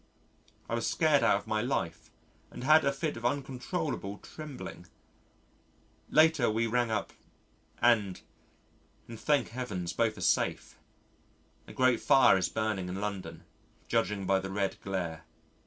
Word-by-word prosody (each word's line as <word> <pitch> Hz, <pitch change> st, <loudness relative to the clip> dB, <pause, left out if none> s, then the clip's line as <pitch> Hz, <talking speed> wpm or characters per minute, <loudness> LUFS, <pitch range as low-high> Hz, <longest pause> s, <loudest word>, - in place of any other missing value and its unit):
I -, -, -5 dB
was 115 Hz, -1 st, 0 dB
scared 155 Hz, -3 st, +3 dB
out -, -, +4 dB
of -, -, -9 dB
my 110 Hz, 0 st, 0 dB
life 85 Hz, -10 st, -3 dB, 0.4 s
and -, -, -9 dB
had 155 Hz, +3 st, +6 dB
a 140 Hz, -, +2 dB
fit 145 Hz, +1 st, -3 dB
of 120 Hz, -, -9 dB
uncontrollable 130 Hz, -, -3 dB
trembling. 140 Hz, -, -9 dB, 1.2 s
Later 155 Hz, -5 st, +4 dB
we 110 Hz, +2 st, +1 dB
rang 120 Hz, +1 st, +1 dB
up 110 Hz, -, -2 dB, 0.7 s
and, 110 Hz, -6 st, +3 dB, 0.9 s
and 115 Hz, -2 st, -9 dB
thank 145 Hz, -2 st, +1 dB
Heavens 105 Hz, -9 st, -4 dB
both 110 Hz, -2 st, 0 dB
are -, -, -8 dB
safe. 90 Hz, -, 0 dB, 0.9 s
A -, -, -10 dB
great 130 Hz, -3 st, +3 dB
fire 135 Hz, -6 st, +6 dB
is 90 Hz, -2 st, 0 dB
burning 105 Hz, -4 st, -2 dB
in 95 Hz, +2 st, -4 dB
London, 100 Hz, -2 st, -5 dB, 0.4 s
judging 100 Hz, 0 st, 0 dB
by 95 Hz, +1 st, +3 dB
the 95 Hz, -, -6 dB
red 95 Hz, 0 st, -2 dB
glare. 85 Hz, -4 st, -4 dB
110 Hz, 140 wpm, -30 LUFS, 95-130 Hz, 1.2 s, had